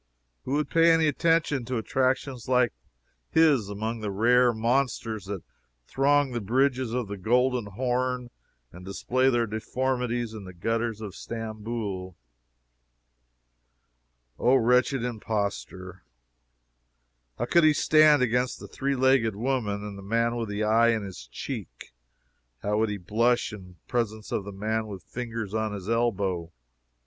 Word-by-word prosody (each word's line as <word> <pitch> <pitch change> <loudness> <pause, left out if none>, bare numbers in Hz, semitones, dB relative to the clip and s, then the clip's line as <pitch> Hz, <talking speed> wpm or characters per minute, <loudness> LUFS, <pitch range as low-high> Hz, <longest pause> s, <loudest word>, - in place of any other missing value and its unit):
Who 130 - -2
would 150 +1 0
pay 165 0 +5
any 165 -1 +4
attention 155 -3 +1
to 125 0 -2
attractions 130 +1 -1
like 125 -2 +3 0.6
his 145 -10 +4
among 110 +3 -3
the 105 -1 -3
rare 120 +5 +4
monsters 115 -2 -1
that 100 -4 -5 0.4
throng 140 - +2
the 120 -1 -3
bridges 130 +3 +1
of 120 -2 -2
the 100 0 -6
Golden 125 +2 +2
Horn 125 +3 -2 0.4
and 90 +1 -12
display 130 +7 +1
their 120 -2 +2
deformities 120 +1 -2
in 110 -2 -8
the 95 -1 -10
gutters 115 +3 -2
of 105 -4 -6
Stamboul? 110 -5 -5 2.2
O, 125 +2 +4
wretched 125 +1 +3
impostor! 100 -5 -4 1.4
How - - -1
could 170 - +4
he 155 - +7
stand 150 -1 +5
against 125 +1 0
the - - -9
three 140 0 -2
legged 130 -5 +3
woman, 110 -3 -1
and 100 -1 -7
the - - -8
man 115 +4 0
with 115 -3 -3
his 105 +1 -2
eye 115 +2 +4
in 115 -2 +1
his 90 -11 -9
cheek? - - -7 0.7
How 105 +1 +1
would 110 0 +2
he 105 - -3
blush 115 +6 +1
in 90 -3 -11
presence 110 -3 -2
of 100 - -2
the 100 - -6
man 110 +3 -2
with 100 -3 -8
fingers 115 -4 -5
on 110 -1 -1
his 100 -2 -7
elbow? 100 -7 0
115 Hz, 145 wpm, -27 LUFS, 105-125 Hz, 2.2 s, he